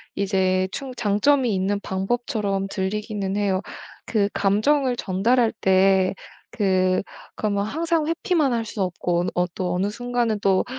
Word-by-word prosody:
이제 190 -1 +1
충 270 -2 -6
장점이 240 +3 +2
있는 195 +2 0
방법처럼 195 0 -2
들리기는 200 0 -3
해요. 195 -2 +1 0.4
그 205 -3 +1
감정을 245 +7 +2
전달할 225 +5 +1
때 190 0 +4 0.4
그 185 -2 +2 0.3
그러면 200 -2 -1
항상 325 +5 0
회피만 335 - +1
할 230 -1 -1
수 210 -1 -5
없고 175 -1 0
어 180 - +2
어 - - -2
또 180 -1 -2
어느 185 +3 0
순간에 240 0 -1
또 190 -2 +2
205 Hz, 265 characters per minute, -23 LUFS, 190-245 Hz, 0.4 s, 때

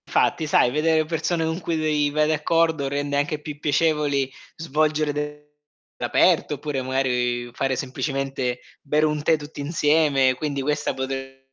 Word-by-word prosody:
Fatti, 160 - +1
sai, 135 -5 +3
vedere 155 +2 +2
persone 165 +1 -1
con 160 +2 -2
cui, 170 -1 -2
vei 150 -2 +1
vai 150 +1 +1
d'accordo 155 -1 +1
rende 145 0 -2
anche 145 +1 -1
più 150 -1 -8
piacevoli 145 -2 +1 0.3
svolgere 155 -1 0
de 150 0 -5 0.6
aperto, 150 - +3
oppure, 145 -1 -3
magari, 125 -2 0
fare 135 +1 0
semplicemente 135 -1 -2 0.2
bere 150 +2 +1
un 150 -1 0
tè 160 +1 +3
tutti 145 -1 -9
insieme. 145 -3 +3
Quindi 140 +1 -3
questa 145 +2 -1
potre 130 0 -3
essere 135 0 -8
150 Hz, 150 wpm, -23 LUFS, 135-155 Hz, 0.6 s, sai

